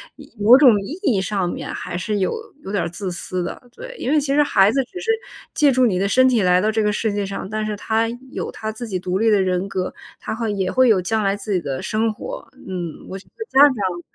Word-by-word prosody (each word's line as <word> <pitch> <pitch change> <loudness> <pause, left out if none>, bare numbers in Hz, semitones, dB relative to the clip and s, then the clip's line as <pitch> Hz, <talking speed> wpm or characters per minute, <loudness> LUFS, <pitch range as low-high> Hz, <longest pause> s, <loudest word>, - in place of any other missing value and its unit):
意 - - -15
某 220 +5 +8
种 245 -8 +6
意 290 - -7
义 260 - +2
上 190 -2 -1
面 - - -5
还 175 - -5
是 205 +3 -2
有 190 - +1 0.3
有 195 - -6
点 200 -4 0
儿 170 - -2
自 180 +2 -5
私 180 +1 -4
的， 175 - -5 0.2
对。 - - -9
因 260 - -2
为 305 - +4
其 285 - -4
实 295 - +5
孩 200 -7 +4
子 270 - 0
只 360 +9 -9
是 450 - -6 0.5
借 295 -2 +4
助 255 0 +2
你 185 -4 0
的 195 - +1
身 260 +5 +4
体 230 -6 +2
来 180 0 +4
到 215 - +1
这 220 0 0
个 210 0 +1
世 220 0 -1
界 205 0 -2
上， 195 0 -6
但 215 0 -2
是 215 -1 -2
他 220 +2 0 0.2
有 - - -4
他 220 0 -5
自 230 +2 -7
己 185 -3 -3
独 185 +1 -2
立 225 +1 +3
的 200 -2 +4
人 185 +1 0
格， 185 -2 -3 0.3
他 - - -4
会 225 -3 -2
也 190 -2 -1
会 255 -1 +4
有 210 -5 +4
将 215 +4 -1
来 195 0 +1
自 205 +1 -6
己 190 - +2
的 140 -5 -4
生 220 0 0
活， - - -8 0.2
嗯。 175 -4 -6
我 190 - -5
觉 195 - -14
得 445 - -5
家 265 - +2
长 200 -11 +3
210 Hz, 290 characters per minute, -21 LUFS, 190-235 Hz, 0.5 s, 某